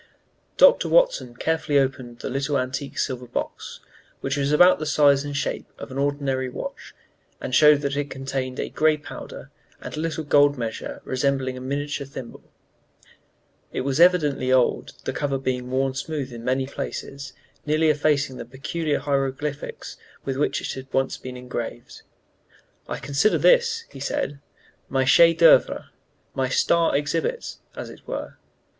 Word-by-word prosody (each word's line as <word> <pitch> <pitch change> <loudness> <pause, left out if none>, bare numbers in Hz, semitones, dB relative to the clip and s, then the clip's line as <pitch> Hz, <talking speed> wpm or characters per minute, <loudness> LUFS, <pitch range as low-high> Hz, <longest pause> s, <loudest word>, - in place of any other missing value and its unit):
Dr. - - +6
Watson - - +3
carefully 155 +1 0
opened 130 -3 -1
the - - -4
little 140 +2 0
antique 130 +2 -3
silver 125 -2 -2
box, 120 - -5 0.4
which 135 0 -1
was 140 0 0
about 180 +4 +6
the 155 - -3
size 145 -2 +4
and 145 -1 -4
shape - - -3
of - - -9
an 135 - -4
ordinary 140 -2 -1
watch, - - -8 0.4
and 130 - -5
showed 150 0 +6
that 140 -1 -1
it 145 0 -2
contained 135 -1 -4
a - - -2
gray 155 0 +3
powder 145 - -10 0.3
and - - -7
a - - -5
little 160 0 -2
gold 145 -1 +4
measure 115 -2 -5
resembling 130 0 -1
a 130 - -8
miniature 140 +1 -3
thimble. 130 -3 -9 1.3
It - - -2
was 135 +2 -1
evidently 160 -7 +4
very 130 - +3
old, 130 -2 +2
the - - -2
cover 140 -2 -1
being 125 -1 -3
worn 135 +1 0
smooth 135 -1 -4
in 115 -1 -8
many 130 +2 0
places, 140 0 -6 0.3
nearly 155 +1 +3
effacing 145 -3 +1
the - - -6
peculiar 145 +5 -2
hieroglyphics 140 +1 -3 0.3
with 135 - -2
which 145 - 0
it - - -3
had 130 0 -9
once 135 0 0
been 125 0 -8
engraved. 120 -1 -6 0.9
"I - - -3
consider 140 +9 +1
this," 470 -2 +4
he - - -10
said, 280 - -2 0.5
"my 135 -1 +1
chef 165 +5 +6
d'œuvre, 165 0 +5 0.4
my 130 -1 -1
'star 165 +2 +3
exhibit,' 465 - -2 0.2
as - - -7
it - - -16
were. - - -5
140 Hz, 160 wpm, -24 LUFS, 130-150 Hz, 1.3 s, Dr